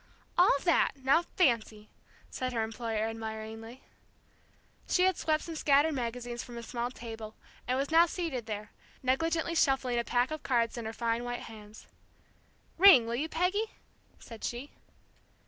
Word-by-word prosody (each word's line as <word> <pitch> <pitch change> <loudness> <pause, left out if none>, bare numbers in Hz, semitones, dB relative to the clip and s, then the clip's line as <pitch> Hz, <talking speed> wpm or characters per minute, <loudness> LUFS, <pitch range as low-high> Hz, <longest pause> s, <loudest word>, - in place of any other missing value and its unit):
"All 355 -5 +5
that, 345 - +3
now 275 +6 +4
fancy!" 230 - 0 0.4
said 255 -1 -3
her 225 -2 0
employer, 220 -1 -2
admiringly. 225 +2 -7 1.1
She 360 - +3
had 375 0 +3
swept 310 -1 0
some 330 - -6
scattered 300 +1 +3
magazines 240 -1 -4
from 240 -1 -10
a 235 - -6
small 240 +1 -3
table, 225 -3 -8 0.3
and 255 - +1
was 275 +3 -2
now 335 +2 +6
seated 325 -10 -4
there, 210 -1 -5 0.3
negligently 325 +6 0
shuffling 270 -6 +2
a - - 0
pack 245 +3 +1
of 310 -1 -4
cards 235 -3 +1
in 235 -2 -5
her 220 - -3
fine 230 +1 -1
white 245 0 -4
hands. 215 -1 -12 0.9
"Ring, 370 -11 +9
will 230 - -3
you, 295 +7 -2
Peggy?" 375 +7 -1 0.4
said 230 -2 -11
she. 245 +4 -4
245 Hz, 155 wpm, -30 LUFS, 225-310 Hz, 1.1 s, Ring